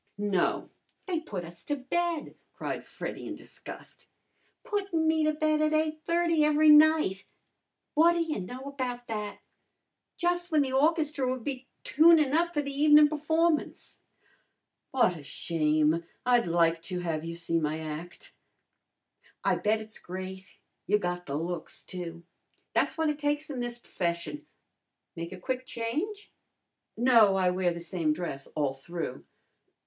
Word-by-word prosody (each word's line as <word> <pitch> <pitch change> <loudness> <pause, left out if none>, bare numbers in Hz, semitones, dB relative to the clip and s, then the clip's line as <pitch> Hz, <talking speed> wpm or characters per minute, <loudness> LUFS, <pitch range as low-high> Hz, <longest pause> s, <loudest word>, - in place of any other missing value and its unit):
"No, 205 -3 0 0.3
they 360 -4 -1
put 195 - -6
us 170 0 -12
to 290 - -1
bed!" 330 +4 -2 0.2
cried - - -5
Freddy - - -6
in - - -5
disgust. - - -10 0.6
"Puttin' 400 -8 -1
me 315 0 +3
to 310 - +3
bed 310 0 +1
at 310 0 +2
8:30 320 +2 +1
every 300 +1 +5
night! 300 -11 +5 0.7
What 330 +3 +5
ta - - -2
y' 320 -8 -2
know 245 +8 -7
about 255 -3 -4
that! 210 -2 -4 0.8
Jus' 350 0 0
w'en 305 -4 +3
the 260 -1 -3
orchestra 295 -2 +2
would 255 -2 -3
be 265 -1 -5 0.2
tunin' 310 -2 +5
up 340 +2 +2
for 295 - +1
the 280 - -4
evenin' 295 +1 +6
p'formance." 320 +2 0 0.9
"What 235 -10 +2
a - - -9
shame! 155 +1 +1 0.2
I'd 245 -4 +4
like 165 -1 +2
to 180 +1 -4
have 160 -3 -2
you 165 0 -5
see 165 0 0
my 155 0 -1
act." 160 +2 -8 1.1
"I - - +3
bet 215 +1 +1
it's 220 0 -9
great. 190 +1 -8 0.3
You 210 - +4
got 180 -2 -3
the 140 - -3
looks, 170 +3 -4
too. 170 -2 -7 0.5
Tha's - - +1
what 320 -1 +2
it 295 - -7
takes 295 0 -1
in 265 - -4
this 240 0 -3
p'fession. 180 - -3 0.7
Make 170 0 -5
a 185 - -7
quick 255 +6 -3
change?" 310 - -3 0.7
"No, 230 -5 +6
I 185 -1 +3
wear 180 -1 +1
the 170 - -5
same 170 -3 -1
dress 150 -5 -5
all 145 -3 0
through." 135 0 -6
245 Hz, 150 wpm, -29 LUFS, -, 1.1 s, evenin